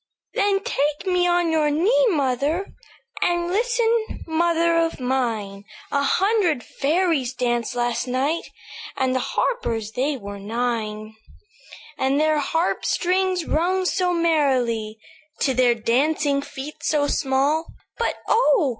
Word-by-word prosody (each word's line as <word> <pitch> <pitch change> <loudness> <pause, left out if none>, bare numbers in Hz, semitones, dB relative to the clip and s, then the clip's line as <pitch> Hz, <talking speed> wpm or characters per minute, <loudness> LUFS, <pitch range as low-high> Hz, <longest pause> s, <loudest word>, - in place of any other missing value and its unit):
"Then 400 -1 +1
take 295 - -1
me 360 -1 +2
on 350 -1 +2
your 310 -2 +2
knee, 435 +12 +3
mother; 290 - 0 0.5
And 345 0 +1
listen, 460 +2 0
mother 335 +1 +2
of 330 -2 0
mine: 230 -6 -2 0.3
A 280 - +1
hundred 370 - +2
fairies 295 -4 0
danced 240 -1 -1
last 240 0 -1
night, 270 +6 -1 0.5
And 260 -1 +1
the - - +2
harpers 230 - -2
they 270 +5 -1
were 200 -3 -8
nine;" 215 0 -3 0.9
"And 270 +2 +1
their 310 0 +2
harp 325 +4 0
strings 370 -1 0
rung 370 +4 0
so 365 -1 +1
merrily 260 -10 +1 0.4
To 270 - +2
their 250 -1 +3
dancing 280 +5 +1
feet 285 +1 -8
so 295 -2 +1
small; 285 +3 +1 0.3
But 470 - 0
oh! 445 - +3
295 Hz, 125 wpm, -23 LUFS, 250-350 Hz, 0.9 s, knee